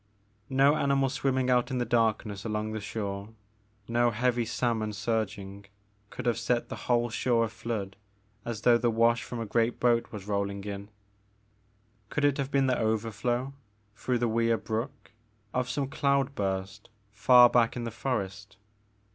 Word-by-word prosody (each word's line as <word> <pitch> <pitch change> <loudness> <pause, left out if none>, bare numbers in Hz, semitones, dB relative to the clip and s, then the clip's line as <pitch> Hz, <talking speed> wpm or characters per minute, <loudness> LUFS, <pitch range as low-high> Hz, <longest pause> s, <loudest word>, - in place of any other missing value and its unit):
No 135 +2 +4
animal 140 -1 +2
swimming 130 -1 0
out 125 0 +2
in 130 - -2
the 120 - 0
darkness 110 -4 0
along 110 -1 -2
the 110 -1 -4
shore, 100 0 -5 0.5
no 120 +1 +2
heavy 120 +1 0
salmon 110 -2 -1
surging, 105 -2 -3 0.4
could 125 - -7
have 120 -1 +1
set 120 0 0
the - - -4
whole 120 -1 +2
shore 115 0 +2
aflood 110 -3 -4 0.5
as 115 -2 -5
though 120 0 +5
the 120 - +2
wash 115 +1 +3
from 120 - -6
a 115 - -3
great 115 +2 0
boat 120 -1 +2
were 105 - -5
rolling 100 0 -3
in. 100 0 -6 1.2
Could 150 - 0
it 145 -1 +2
have 135 -1 -1
been 140 -1 +2
the 130 -2 +1
overflow, 115 +4 -1 0.4
through 125 +2 -1
the 120 0 0
Weir 115 0 +2
Brook, 115 +6 -5 0.4
of 125 0 -1
some 135 +1 -1
cloud 140 0 +1
burst 95 -4 -3 0.2
fer 125 +4 +7
back 120 -1 +2
in 120 - -4
the 115 - -4
forest? 100 -4 -4
115 Hz, 160 wpm, -28 LUFS, 105-125 Hz, 1.2 s, fer